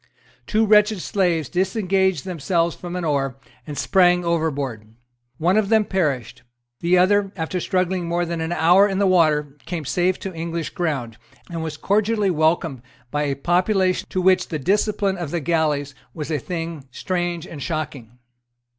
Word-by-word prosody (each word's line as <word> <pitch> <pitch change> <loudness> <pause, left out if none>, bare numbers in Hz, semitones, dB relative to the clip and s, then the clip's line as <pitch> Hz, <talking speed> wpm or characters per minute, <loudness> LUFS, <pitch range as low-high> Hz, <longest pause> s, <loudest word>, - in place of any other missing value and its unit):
Two 220 +1 +2
wretched 210 -1 +4
slaves 175 -5 0
disengaged 190 - 0
themselves 170 -1 0
from 175 0 -7
an 180 -2 -2
oar, 135 -4 0 0.3
and 145 -2 -6
sprang 180 -2 +3
overboard. 140 -10 -2 0.4
One 180 +5 +2
of 210 -2 +1
them 220 -1 +4
perished. 140 - -1 0.4
The 175 +2 +3
other, 195 +2 +3
after 175 +1 -3
struggling 185 0 -1
more 175 +1 0
than 170 -1 -3
an 160 +1 -3
hour 175 +4 +5
in 195 -2 -2
the 200 - +2
water, 155 -6 +2
came 165 -3 -4
safe 180 +6 +1
to 195 - -5
English 165 0 -4
ground, 135 -10 -3 0.3
and 165 -1 -4
was 160 -1 -5
cordially 210 +2 +1
welcomed 160 -4 +1 0.3
by 150 0 0
a 140 -1 -1
population 185 +5 +1
to 185 - -1
which 185 -1 +4
the 160 - -3
discipline 195 +3 0
of 170 -4 -4
the 170 - -1
galleys 150 -3 0 0.2
was 155 0 -5
a 150 - 0
thing 165 -1 -5
strange 175 +4 -3
and 155 -5 -9
shocking. 140 -8 -5
170 Hz, 165 wpm, -22 LUFS, 155-185 Hz, 0.4 s, hour